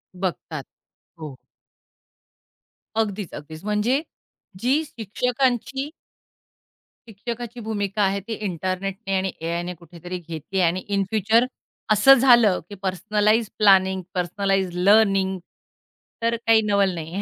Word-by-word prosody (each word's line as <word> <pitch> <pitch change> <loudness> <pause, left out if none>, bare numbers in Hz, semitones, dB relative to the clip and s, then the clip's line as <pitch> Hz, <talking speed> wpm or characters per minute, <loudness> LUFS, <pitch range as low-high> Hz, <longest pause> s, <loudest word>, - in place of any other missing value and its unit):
बघतात, 175 -5 -4 0.6
हो. 150 -4 -7 1.6
अगदीच, 205 -4 -2
अगदीच. 155 +3 -9
म्हणजे 210 +7 +1 0.6
जी 265 +8 +2
शिक्षकांची 250 +3 -1 1.2
शिक्षकाची 235 +3 -6
भूमिका 210 -2 -2
आहे 195 0 +1
ती 230 - -3
इंटरनेटने 190 +2 -3
आणि 190 0 -1
एआयने 170 +2 -3
कुठेतरी 175 +1 -8
घेतली 170 +4 -4
आणि 175 +1 +2
इन 200 -1 +1
फ्युचर 220 +3 +3 0.5
असं 215 +6 +7
झालं, 235 -7 +5
की 205 - -8
पर्सनलाइज्ड 210 +3 +1
प्लॅनिंग, 190 -2 +5
पर्सनलाइज्ड 190 +1 0
लर्निंग 195 -3 +4 0.8
तर 230 0 +1
काही 225 -1 +5
नवल 200 -2 +2
नाहीये. 165 +4 -5
200 Hz, 105 wpm, -23 LUFS, 185-225 Hz, 1.6 s, असं